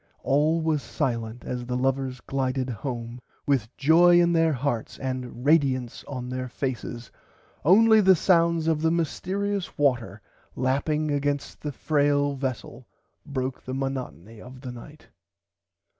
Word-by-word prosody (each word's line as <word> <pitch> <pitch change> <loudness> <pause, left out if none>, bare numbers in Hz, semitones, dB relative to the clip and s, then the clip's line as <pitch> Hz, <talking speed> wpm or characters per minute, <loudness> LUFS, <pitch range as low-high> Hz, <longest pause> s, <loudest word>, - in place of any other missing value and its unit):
All 150 +4 +2
was 160 -2 0
silent 115 -3 -3
as 125 -1 -4
the 125 0 -1
lovers 130 -1 -1
glided 130 -1 -2
home 120 0 -5 0.2
with 130 -6 +1
joy 175 +4 +6
in 170 0 +3
their 165 -1 +3
hearts 125 -3 -2
and 130 -1 -5
radiunce 135 -6 +2
on 125 -3 -5
their 130 0 -4
faces 120 -2 -5 0.5
only 220 +6 +6
the 190 -1 +6
sound 170 -2 +2
of 160 -2 +1
the 160 - +3
mystearious 190 +4 -2
water 120 -9 +1 0.4
lapping 145 +4 0
against 145 0 -2
the 150 - -3
frail 145 -1 +1
vessel 130 -2 -5 0.4
broke 130 -2 -3
the 130 - -5
monotony 125 - -5
of 130 0 -12
the 130 -2 -6
night. 145 +6 -13
135 Hz, 135 wpm, -26 LUFS, 125-155 Hz, 0.5 s, joy